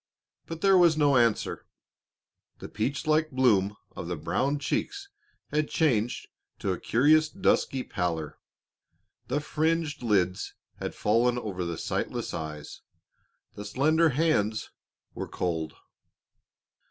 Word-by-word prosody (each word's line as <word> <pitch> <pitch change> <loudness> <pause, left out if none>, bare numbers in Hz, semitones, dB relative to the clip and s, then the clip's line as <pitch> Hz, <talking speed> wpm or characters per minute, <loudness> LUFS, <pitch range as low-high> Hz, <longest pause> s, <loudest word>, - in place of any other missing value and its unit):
But 165 0 -7
there 195 -2 +5
was 170 -3 +5
no 145 -2 +4
answer; 115 -3 +1 0.9
the - - -8
peach 130 +9 -2
like 155 0 +2
bloom 105 -7 +2 0.2
of 85 - -6
the 90 - -2
brown 95 - -1
cheeks 395 - -3 0.4
had 150 0 0
changed 120 -7 0 0.3
to 95 - -2
a 90 - -3
curious 155 +6 +3
dusky 135 -8 +1
pallor, 80 -4 -3 0.9
the 140 +4 0
fringed 155 0 -1
lids 95 -6 0 0.2
had - - -5
fallen 120 +3 +2
over 100 -6 -4
the 85 -1 -4
sightless - - -3
eyes, 75 -2 -6 0.7
the 105 - -8
slender 155 +8 +2
hands 125 -8 0 0.4
were - - -5
cold. 80 -3 -3
125 Hz, 120 wpm, -27 LUFS, 95-155 Hz, 0.9 s, there